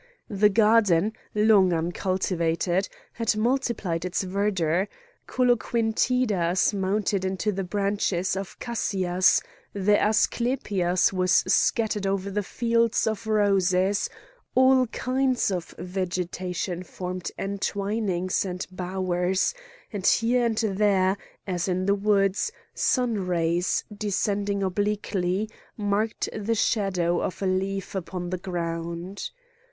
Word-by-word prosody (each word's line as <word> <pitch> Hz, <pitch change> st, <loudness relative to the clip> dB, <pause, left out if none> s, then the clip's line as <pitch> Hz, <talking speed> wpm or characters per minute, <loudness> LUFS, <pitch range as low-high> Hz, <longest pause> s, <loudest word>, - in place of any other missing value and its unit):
The 205 Hz, +1 st, +4 dB
garden, 210 Hz, -2 st, +4 dB, 0.2 s
long 210 Hz, -3 st, +5 dB
uncultivated, 175 Hz, +1 st, 0 dB, 0.2 s
had 230 Hz, -2 st, 0 dB
multiplied 220 Hz, -8 st, 0 dB
its 180 Hz, +1 st, -1 dB
verdure; 190 Hz, -2 st, 0 dB, 0.4 s
coloquintidas 225 Hz, -6 st, +1 dB
mounted 200 Hz, 0 st, 0 dB
into 190 Hz, +3 st, -1 dB
the 195 Hz, -1 st, -3 dB
branches 195 Hz, -1 st, 0 dB
of 195 Hz, -1 st, -6 dB
cassias, 185 Hz, -6 st, +1 dB, 0.3 s
the 200 Hz, +1 st, +2 dB
asclepias 210 Hz, -5 st, +1 dB
was 185 Hz, -1 st, +1 dB
scattered 215 Hz, -3 st, +1 dB
over 195 Hz, +1 st, -1 dB
fields 230 Hz, +2 st, +1 dB
of 220 Hz, 0 st, -2 dB
roses, 195 Hz, -2 st, +2 dB, 0.5 s
all 260 Hz, 0 st, +5 dB
kinds 255 Hz, -1 st, 0 dB
of 175 Hz, -3 st, -4 dB
vegetation 180 Hz, 0 st, -3 dB
formed 180 Hz, 0 st, -5 dB
entwinings 195 Hz, -1 st, -1 dB
and 185 Hz, -1 st, -4 dB
bowers; 185 Hz, -, -1 dB, 0.4 s
and 195 Hz, -2 st, -1 dB
here 240 Hz, +1 st, +3 dB
and 225 Hz, -2 st, -2 dB
there, 200 Hz, -3 st, +2 dB, 0.3 s
as 180 Hz, -2 st, -2 dB
in 185 Hz, 0 st, 0 dB
the 200 Hz, -, +3 dB
woods, 200 Hz, -, +1 dB, 0.2 s
sun 230 Hz, -7 st, 0 dB
rays, 170 Hz, 0 st, +1 dB
descending 200 Hz, -1 st, -1 dB
obliquely, 200 Hz, 0 st, -1 dB, 0.3 s
marked 210 Hz, +1 st, -1 dB
the 220 Hz, +2 st, -1 dB
shadow 185 Hz, -6 st, +1 dB
of -, -, -3 dB
a -, -, +1 dB
leaf 190 Hz, +1 st, -1 dB
upon 180 Hz, -1 st, -4 dB
the 185 Hz, -, -2 dB
ground. 170 Hz, +1 st, -4 dB
195 Hz, 105 wpm, -26 LUFS, 180-215 Hz, 0.5 s, long